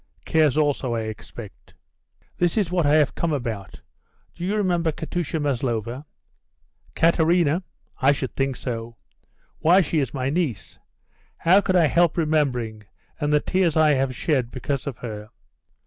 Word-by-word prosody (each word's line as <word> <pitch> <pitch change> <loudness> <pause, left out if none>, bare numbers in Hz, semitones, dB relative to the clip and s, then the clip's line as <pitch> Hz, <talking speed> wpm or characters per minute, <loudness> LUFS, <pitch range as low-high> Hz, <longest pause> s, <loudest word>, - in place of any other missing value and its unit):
Cares 155 -3 +3
also, 140 -5 +1
I 115 - -1
expect?" 110 -1 -9 0.6
"This 175 +3 +1
is 195 -5 +1
what 175 -4 +2
I 145 - +4
have 150 -3 +3
come 170 - -1
about: 115 -9 -4 0.5
Do 175 - -8
you 195 +4 0
remember 175 -5 +1
Katusha 160 +1 -3
Maslova?" 125 -1 -2 0.9
"Katerina? 165 0 +3 0.4
I 135 +1 +5
should 135 -2 -3
think 135 -1 0
so. 115 -2 -5 0.6
Why, 175 +4 +5
she 160 -1 0
is 135 -5 -1
my 135 -1 -2
niece. 145 - -3 0.6
How 185 +4 +5
could 185 - 0
I 175 -3 +5
help 170 +3 +2
remembering; 130 -9 0 0.4
and 145 -1 0
the 150 - +4
tears 180 -4 +1
I 155 -1 +5
have 135 -2 0
shed 130 -6 0
because 135 +2 -4
of 130 -4 -4
her. 105 -3 -7
145 Hz, 150 wpm, -23 LUFS, 125-165 Hz, 0.9 s, I